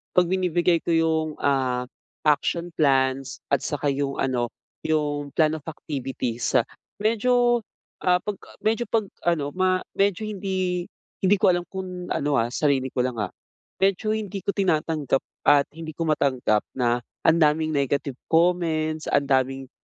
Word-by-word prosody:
kapag 180 -1 +5
binibigay 175 -2 +2
ko - - -6
iyung, 160 -1 +2
ah, 130 -3 +1 0.4
action 170 +3 +1
plans. 130 -3 +2 0.2
At 140 - +3
saka 145 0 -2
iyung 140 0 -2
ano, 125 -3 0 0.3
iyung 145 -2 0
plan 155 -1 +4
of 150 - -8
activities. 130 -6 -2 0.4
Medyo, 240 +2 +3 0.4
ah, 180 -1 +4
kapag 205 +1 -4
a - - -13
medyo 225 +2 +2
kapag 220 -2 +1 0.2
ano, 145 -4 -1
ma 185 0 +2 0.2
medyo 200 +1 +1
hindi 185 -3 -2 0.3
hindi 195 +2 +5
ko - - +1
alam 175 0 -1
kung 185 -2 -6
ano, 145 0 0
ah, 115 +1 0
sarili 135 0 +1
ko 125 0 0
lang, 125 -2 -3
ah. 95 - -2 0.5
Medyo 195 +2 +2
hindi 205 -2 -5
ko - - -4
tinatanggap 155 -7 +1 0.3
at 145 -1 +7
hindi 160 0 -8
ko 165 - -2
matanggap 130 -8 +2
na 120 -2 +2 0.3
ang 160 - +6
daming 155 0 +3
negative 140 -1 0
comments, 160 -2 +1
ang 140 - +2
daming 135 0 +1
155 Hz, 150 wpm, -24 LUFS, 135-180 Hz, 0.5 s, at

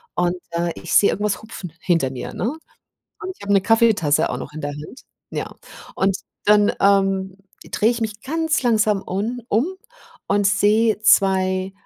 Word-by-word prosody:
und, 175 0 +1 0.2
äh, 170 0 -1
ich - - -6
sehe 200 - +6
irgendwas 205 -1 -2
hupfen 195 -6 -9
hinter 165 -7 +1
mir, 130 - -7
ne? - - -3 0.8
Und 375 -2 -4
ich - - -16
habe 200 0 -1
'ne 195 - +5
Kaffeetasse 225 -10 +3
auch 125 - -3
noch 130 - -8
in 155 - -7
der 145 -1 -3
Hand, 150 - -10 0.3
ja. - - -5 0.4
Und 190 0 +1 0.3
dann, 210 0 +4
ähm, 195 -1 +2 0.3
drehe 215 - +2
ich 235 - -3
mich 215 -1 -4
ganz 320 +1 -1
langsam 215 -4 +2
un 220 +7 -3
um 225 +8 +2 0.6
und 200 0 +2
sehe 210 +3 +3
2, 190 -3 +3
200 Hz, 165 wpm, -21 LUFS, 185-220 Hz, 0.8 s, sehe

